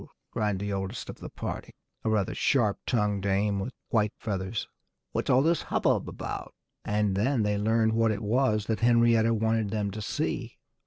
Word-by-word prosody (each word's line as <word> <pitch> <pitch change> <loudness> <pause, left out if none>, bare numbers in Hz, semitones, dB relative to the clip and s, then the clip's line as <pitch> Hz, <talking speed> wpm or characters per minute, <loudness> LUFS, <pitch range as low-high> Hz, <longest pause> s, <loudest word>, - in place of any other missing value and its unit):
cried 105 -2 0
the 100 +1 -3
oldest 95 +3 -4
of - - -14
the - - -8
party, - - -6 0.3
a - - 0
rather 105 -3 +1
sharp 110 -7 +2
tongued 105 -4 +1
dame 100 +1 +1
with 110 +6 -3 0.2
white 105 -2 +2
feathers. 100 0 -3 0.4
"What's - - -2
all 130 +2 +5
this 165 +2 +2
hubbub - - +1
about?" - - -6 0.3
And 105 -2 +1
then 120 +4 +2
they 105 0 +1
learned 110 +1 +2
what 115 0 +3
it 110 0 -2
was 110 -1 +2
that 110 -1 -1
Henrietta 115 -1 +4
wanted 110 -1 +1
them 105 -1 -1
to 110 +2 -6
see. - - -3
110 Hz, 175 wpm, -28 LUFS, 100-115 Hz, 0.4 s, all